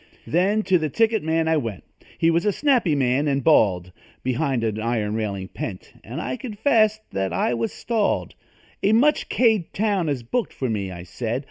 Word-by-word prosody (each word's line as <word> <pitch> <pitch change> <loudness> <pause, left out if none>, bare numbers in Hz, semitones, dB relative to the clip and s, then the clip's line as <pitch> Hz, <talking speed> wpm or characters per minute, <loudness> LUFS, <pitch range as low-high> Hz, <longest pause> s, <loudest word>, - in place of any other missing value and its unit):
Then 195 +6 +1
to 185 -2 +3
the 155 -1 -1
ticket 220 +5 +2
man 160 +1 0
I 160 0 +3
went 115 -9 -4 0.3
He 165 - +3
was 170 +1 +1
a 210 - +2
snappy 245 - +2
man, 135 +2 +1
and 140 -2 0
bald, 90 - +3 0.3
Behind 130 -1 0
an 110 -1 -1
iron 110 -2 -1
railing 100 -4 -3
pent 95 -4 -7
And 125 +7 -6
I - - -3
confessed 220 -2 +1
that 95 -1 -2
I 90 +7 0
was 115 -1 -1
stalled. 225 -3 -1 0.5
"A 205 - +3
much 285 +7 +3
K'd 220 -8 +2
town 200 -6 +1
is 135 -4 -2
booked 235 - -2
for 130 -3 -2
me," 100 -3 -3
I 85 -1 -8
said. 115 +7 -3
150 Hz, 190 wpm, -23 LUFS, -, 0.5 s, to